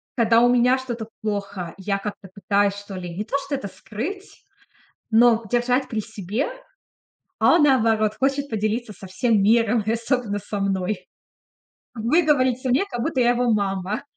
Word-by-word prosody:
когда 230 -1 +4
у 245 - +5
меня 250 +1 +4
что-то 240 -4 -5
плохо, 200 -5 -4
я 195 +1 -2
как-то 200 -1 -7
пытаюсь, 200 +1 +1
что 205 -1 -9
ли, 175 -2 -6
не 205 - -3
то 230 - -4
что 280 0 -2
это 265 -7 -5
скрыть, 235 - -7 0.7
но 230 0 +5
держать 245 +2 +1
при 220 - -2
себе. 215 - -3 0.9
А - - +5
он, 335 - +4
наоборот, 225 -6 +3
хочет 275 +3 0
поделиться 215 +1 -2
со 190 0 -11
всем 200 +3 +1
миром 225 +1 +3
и 220 - +1
особенно 230 -2 -1
со 205 0 -5
мной. 190 -1 -2 0.9
Выговориться 260 0 +2
мне, 260 +8 +3
как-будто 260 -5 -2
я 240 - +4
его 245 0 +1
мама. 200 +1 -1
225 Hz, 155 wpm, -23 LUFS, 200-250 Hz, 0.9 s, у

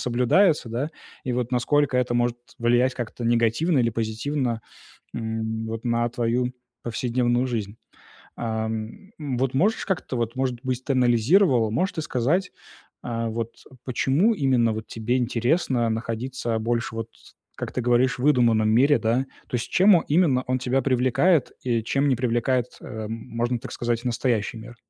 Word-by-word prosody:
соблюдается, 125 - +2
да, 125 +6 -2 0.4
и, 130 - -1
вот, 125 -1 -2
насколько 130 +2 +2
это 125 -1 +1
может 120 0 +1 0.2
влиять, 120 +2 +2
как-то, 120 0 -5
негативно, 120 +7 +2
или 115 -1 +2
позитивно, 115 +2 -2 0.5
м, 110 -1 -3
вот, 115 +1 -5
на 120 0 +1
твою 125 +1 -1 0.3
повседневную 120 +1 0
жизнь. 110 -5 -3 0.6
Ам, 110 - -4
вот, 135 -3 -2
можешь, 200 +11 +1
как-то, 185 -9 -2
вот, 115 0 -2
может 130 -2 -1
быть, 130 -1 -2
ты 140 - 0
анализировал, 125 - +3
можешь 180 - 0
ты 160 - -4
сказать, 155 +7 0 0.5
э, 115 -1 -2
вот 115 +1 -4 0.3
почему 140 - +2
именно, 130 - +2
вот, 110 0 -5
тебе 120 +3 -1
интересно 120 +1 +1
находиться 115 +1 -3
больше, 115 +1 -2
вот, 115 0 -4 0.5
как - - -5
ты 125 - -2
говоришь, 125 +2 +2
в - - -5
выдуманном 120 -6 +4
мире, 135 +6 +4
да? 120 +4 0 0.2
То 125 - -1
есть, 115 - -4
чем 190 +1 +6
о 165 - 0
именно 145 -5 +3
он 130 0 0
тебя 130 +1 0
привлекает, 130 +5 +2
и 120 -3 0
чем 140 +4 +1
не 130 - +3
привлекает, 120 0 +1
эм, 110 0 -6
можно 120 +1 -2
так - - -8
сказать, 120 0 -2
и - - -5
настоящий 120 -3 -1
мир? 120 +2 -11
120 Hz, 160 wpm, -24 LUFS, 115-130 Hz, 0.6 s, чем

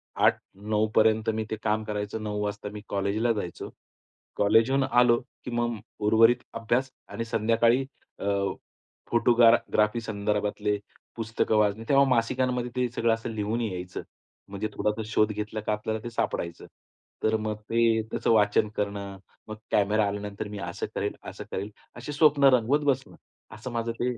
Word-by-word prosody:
8:00, - - +4 0.2
9:00 105 +2 0
पर्यंत 110 0 +4
मी 110 0 -1
ते - - 0
काम 110 +1 +1
करायचो. 105 0 -4
9:00 105 -1 -3
वाजता 105 0 -4
मी 105 - -7
कॉलेजला 100 +4 0
जायचो. 100 -5 -5 0.7
कॉलेजहून 115 +6 +4
आलो, 125 -2 +4 0.3
की 125 - -5
मग 120 0 0 0.3
उर्वरित 115 +3 +5
अभ्यास 120 +4 0 0.2
आणि 115 - -4
संध्याकाळी 115 +3 +2 0.3
अ, - - -5 0.9
फोटोग्रा 120 0 +6 0.2
ग्राफी 105 +2 +2
संदर्भातले 105 -1 -1 0.4
पुस्तकं 110 -1 0
वाचणे. 105 +1 +2
तेव्हा 140 0 +6
मासिकांमध्ये 125 0 +1
ते 125 -1 +1
सगळं 115 -1 +2
असं 115 +1 -4
लिहून 110 +3 -1
यायचं. 90 -5 -4 0.5
म्हणजे 100 +2 -3
थोडासा 105 +1 -1
शोध 110 0 +2
घेतला 105 +1 -4
का 105 - -1
आपल्याला 110 +1 -3
ते 120 - -4
सापडायचं. 85 -6 -3 0.6
तर 110 0 +3
मग 110 0 -3
ते 115 -1 +3
त्याचं - - 0
वाचन 105 -1 +4
करणं, 100 -1 -3 0.3
मग 110 - -6 0.2
कॅमेरा 105 +1 +3
आल्यानंतर 105 +1 -4
मी 105 -1 -7
असं - - -4
करेल, - - -2
असं - - -8
करेल 100 +3 -4 0.2
अशी 120 +5 -6
स्वप्न 145 -1 +4
रंगवत 130 +5 +1
बसणं. 135 -2 0 0.4
असं 115 +4 -7
माझं 115 0 -2
ते 125 0 0
110 Hz, 155 wpm, -27 LUFS, 105-120 Hz, 0.9 s, फोटोग्रा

